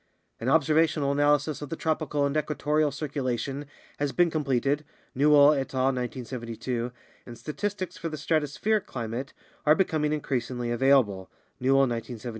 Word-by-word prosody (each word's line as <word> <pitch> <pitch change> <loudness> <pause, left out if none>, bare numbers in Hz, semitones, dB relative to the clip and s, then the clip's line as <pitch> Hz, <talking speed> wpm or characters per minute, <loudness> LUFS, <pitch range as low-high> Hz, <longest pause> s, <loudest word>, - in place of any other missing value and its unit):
An 115 - -1
observational 155 -1 +3
analysis 145 +1 +2
of 145 - -6
the 165 - -3
tropical 155 -3 0
and 140 +1 -1
equatorial 150 0 +1
circulation 140 -1 -3 0.3
has 145 -1 0
been 175 +1 +2
completed 140 -1 0 0.3
(Newell 145 +1 +6
et 135 -2 -3
al., 130 +1 +2
1972), 120 -1 -4 0.4
and 120 -1 -9
statistics 190 +4 -4
for 165 - -4
the 155 - -5
strato 155 0 +1
spheric 210 +9 -1
climate 120 +2 -5 0.3
are 150 +1 +5
becoming 155 -5 +1
increasingly 125 -5 -2
available 120 -7 +2 0.3
(Newell, 135 +2 +4
1972). 120 -2 -2
140 Hz, 140 wpm, -27 LUFS, 125-150 Hz, 0.4 s, Newell